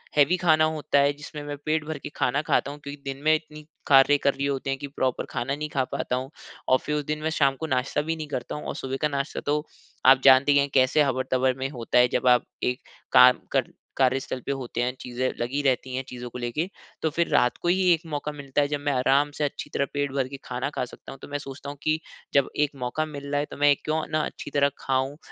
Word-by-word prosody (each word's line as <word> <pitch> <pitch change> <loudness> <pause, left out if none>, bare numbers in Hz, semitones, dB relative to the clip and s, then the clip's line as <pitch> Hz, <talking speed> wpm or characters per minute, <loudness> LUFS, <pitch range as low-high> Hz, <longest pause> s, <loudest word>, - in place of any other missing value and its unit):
Heavy 150 +4 +5
खाना 160 -3 +4
होता 150 -2 +1
है 140 +1 +3
जिसमें 145 +1 -9
मैं 145 0 -5
पेट 155 0 +1
भर 155 0 -4
के - - -7
खाना 140 +4 +1
खाता 140 -2 +1
हूँ। 145 - -10
क्योंकि 145 0 -9
दिन 135 0 -5
में 155 +1 +5
इतनी 155 -1 -8 0.2
कार्य 140 +1 +6
कर 140 -1 +1
रही 140 - -3
होते 140 -1 -2
हैं 135 - 0
कि 140 - -5
प्रॉपर 130 -2 -1
खाना 130 +2 -2
नहीं 150 +1 -4
खा 135 -3 0
पाता 125 - -3
हूँ 130 +1 -4 0.4
और 130 - +5
फ़िर, 150 - -3
उस 150 -1 -2
दिन 150 +1 -2
मैं 160 - 0
शाम 140 -4 +2
को 160 - -3
नाश्ता 130 +1 0
भी 160 +2 -2
नहीं 155 -1 -6
करता 125 -4 -4
हूँ 150 - -7
और - - -4
सुबह 135 0 -4
का 150 - +3
नाश्ता 140 0 -3
तो 150 +1 0 0.4
आप 130 0 +7
जानते 135 +1 +7
ही 145 - +5
हैं 140 0 +1
कैसे 130 +3 +4
हबर-तबर 130 -1 +1
में 135 0 -2
होता 125 -3 -2
है 125 0 +7
जब - - +1
आप 125 -1 +5 0.2
एक 125 +1 0 0.3
काम 125 0 +7
कर - - 0 0.3
कार्यस्थल 130 0 +1
पर - - 0
होते 130 -3 -3
हैं 125 +1 -1
चीज़ें 125 +1 -2
लगी 125 +5 -1
रहती 130 -2 0
हैं 130 - -2
चीज़ों 125 -1 -7
को 125 - -8
लेके। 125 +9 -2 0.3
तो 160 - +1
फ़िर 170 +2 0
रात 125 - +3
को - - -2
ही 185 +2 +3
1 165 - -1
मौका 145 +1 -2
मिलता 145 -1 -2
है 145 - +1
जब 145 0 -2
मैं 145 - +2
आराम 135 +3 +2
से 150 - -1
अच्छी 145 - -3
तरह 140 - +1
पेट 145 -1 -1
भर 135 -1 -1
के 140 +1 -8
खाना 125 +2 -3
खा - - -1
सकता 125 - -12
हूँ। 135 - -11
तो - - -9
मैं 145 - -3
सोचता 140 0 -8
हूँ 145 - -8
कि 155 0 +1 0.3
जब 140 -2 +3 0.2
1 145 - -9
मौका 140 +6 -1
मिल 145 -2 -8
रहा 145 - +1
है 145 - -1
तो - - -8
मैं 145 0 +5
क्यों 155 +1 0
ना 155 - +1
अच्छी - - -8
तरह 140 0 +3
खाऊँ 135 +2 -1
140 Hz, 260 wpm, -25 LUFS, 130-150 Hz, 0.4 s, आप